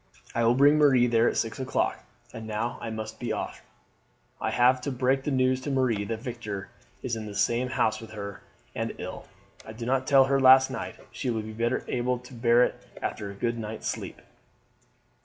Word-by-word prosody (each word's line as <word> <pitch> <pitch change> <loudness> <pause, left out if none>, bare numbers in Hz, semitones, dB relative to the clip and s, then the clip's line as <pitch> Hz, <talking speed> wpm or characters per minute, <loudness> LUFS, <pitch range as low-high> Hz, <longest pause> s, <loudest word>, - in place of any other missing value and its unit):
I 115 - +1
will 115 +1 +4
bring 145 +3 +5
Marie 135 -5 +5
there 115 -1 +3
at - - -3
six 115 +3 -2
o'clock. 130 -1 -1 0.3
And 110 -1 -7
now 110 +2 -3
I 115 - -4
must 110 0 -6
be 120 - -3
off; - - -4 0.8
I - - 0
have 125 +1 +3
to 140 - -3
break 130 +1 +1
the - - 0
news 130 -1 +2
to 145 - -4
Marie 125 -7 +1
that 110 +1 -4
Victor 110 -6 -5 0.3
is 125 -3 -1
in 110 -1 -6
the 105 - -8
same 120 +5 +1
house 115 -4 0
with 115 - -10
her 100 -2 -7 0.3
and - - -3
ill. - - -7 0.4
I 110 - -9
did 115 +1 -6
not 130 +1 0
tell 135 -2 +6
her 135 +1 +2
last 130 0 +7
night. - - -5 0.2
She 130 - -3
will 110 -2 -1
be 110 0 -7
better 115 +3 -1
able 125 0 0
to 125 +1 -14
bear 120 0 +4
it - - -2 0.2
after 100 - -4
a 100 - -8
good 115 +3 -2
night's 110 0 -5
sleep." - - -4
120 Hz, 210 wpm, -27 LUFS, 110-130 Hz, 0.8 s, last